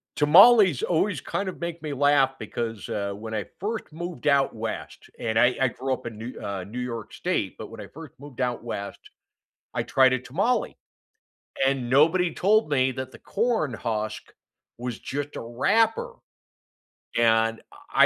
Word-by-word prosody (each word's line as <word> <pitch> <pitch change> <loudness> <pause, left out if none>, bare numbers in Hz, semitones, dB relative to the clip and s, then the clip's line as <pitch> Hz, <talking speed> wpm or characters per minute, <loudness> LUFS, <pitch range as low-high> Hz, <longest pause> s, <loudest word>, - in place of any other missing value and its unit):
tamales 185 - +7
always 175 -3 +1
kind 200 -1 -3
of - - -9
make 170 -1 -5
me 150 -2 -4
laugh 140 -1 +4
because, 115 -4 -4
uh, 100 -1 -2
when 110 +2 -7
I 105 -2 -2
first 215 +4 -3
moved 175 0 -5
out 140 -4 +3
west- 110 0 -6
and 110 -1 -1
I 125 +2 +4
I 130 - +5
grew 130 +2 -3
up 125 - -6
in 115 -2 -6
New 115 +3 -7
uh, 100 -2 -4
New 110 +7 -7
York 115 -3 -5
State- - - -2
but - - -8
when - - -9
I - - -9
first 160 -1 -11
moved 140 -2 -9
out 125 -2 -1
west, 100 -4 -5 0.7
I - - -1
tried 130 -1 +4
a 130 - +1
tamale, 190 - -1 0.9
and 135 -3 0
nobody 165 +6 +4
told 210 -1 +3
me 130 -2 +2
that 130 0 -5
the - - -12
corn 220 - 0
husk 110 -1 -4 0.5
was 120 -1 -4
just 145 +1 -5
a - - -4
wrapper, 225 - +1 1.0
and 115 -1 +3
I - - +2
130 Hz, 170 wpm, -25 LUFS, 115-170 Hz, 1.0 s, tamales